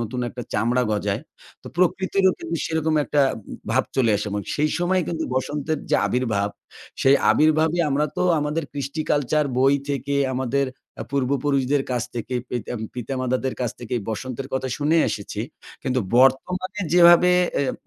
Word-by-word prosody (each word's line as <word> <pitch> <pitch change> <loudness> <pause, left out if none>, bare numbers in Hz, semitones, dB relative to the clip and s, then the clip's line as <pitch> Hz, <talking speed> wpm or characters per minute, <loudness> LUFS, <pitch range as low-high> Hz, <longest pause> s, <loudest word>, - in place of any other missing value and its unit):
নতুন 120 +2 -3
একটা 125 +1 -7
চামড়া 120 +4 +1
গজায়। 105 -1 -1 0.4
তো - - -14
প্রকৃতিরও 190 +2 +2
কিন্তু 170 - -4
সেরকম 160 -1 0
একটা 145 - +1 0.2
উম 110 - -10 0.2
ভাব - - +2
চলে 125 -4 +3
আসে 105 - -4
এমন। 100 0 -2
সেই 150 +1 +1
সময় 180 +2 +2
কিন্তু 165 -1 -2
বসন্তের 145 +3 -1
যে - - +4
আবির্ভাব, 110 -5 0 0.5
সেই 135 +1 +6
আবির্ভাবই 155 +2 +3
আমরা 145 +2 +1
তো - - +1 0.2
আমাদের 150 +2 -1
কৃষ্টি-কালচার, 145 +1 0
বই 135 +2 +5
থেকে, 140 0 -2 0.2
আমাদের 130 +2 0 0.3
অ্যা 110 - -6
পূর্বপুরুষদের 140 0 +1
কাছ 125 -2 0
থেকে, 120 +2 -4 0.2
পিতা 120 -2 -4
ম - - -5
পিতামাতাদের 130 +1 -2
কাছ 120 -2 0
থেকে 120 0 -4
বসন্তের 130 +4 -4
কথা 130 0 -1
শুনে 150 +3 +2
এসেছি। 105 0 -5 0.4
কিন্তু 130 -1 0 0.2
বর্তমানে 180 - +2
যেভাবে 175 0 +7 0.3
অ্যা 135 -2 +1
135 Hz, 155 wpm, -23 LUFS, 125-155 Hz, 0.5 s, যেভাবে